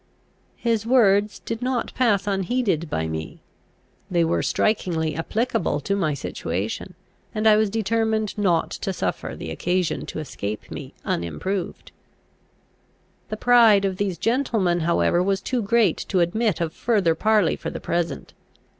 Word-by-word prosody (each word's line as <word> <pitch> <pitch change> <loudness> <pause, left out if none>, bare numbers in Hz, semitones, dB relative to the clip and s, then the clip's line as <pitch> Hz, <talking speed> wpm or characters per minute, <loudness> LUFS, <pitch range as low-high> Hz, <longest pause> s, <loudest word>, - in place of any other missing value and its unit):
His 230 -3 0
words 210 -4 +3
did 230 +1 -5
not 250 -2 -1
pass 210 -6 +2
unheeded 195 -4 0
by 80 - -1
me. 80 0 -5 0.7
They 175 -3 +2
were 165 - +1
strikingly 165 -7 0
applicable 200 +2 -1
to 200 +7 -1
my 155 -7 0
situation, 95 - -4 0.4
and 215 0 -1
I 215 -1 +7
was 215 -1 +2
determined 220 0 0
not 185 -5 +1
to 195 - -3
suffer - - -3
the 80 - -6
occasion 175 - -1
to - - -6
escape 105 -8 -5
me - - -8
unimproved. 125 - -3 1.4
The 215 - -4
pride 225 -4 +5
of 190 -1 -1
these 195 -3 -1
gentlemen 220 - +1
however 170 +1 +2
was 195 +1 +1
too 250 +2 -2
great 215 -4 +2
to 190 - +2
admit 205 +2 +1
of 160 -1 -1
further 205 -8 +2
parley 210 +1 +2
for - - -5
the - - -6
present. 170 0 -3
195 Hz, 145 wpm, -23 LUFS, 170-220 Hz, 1.4 s, I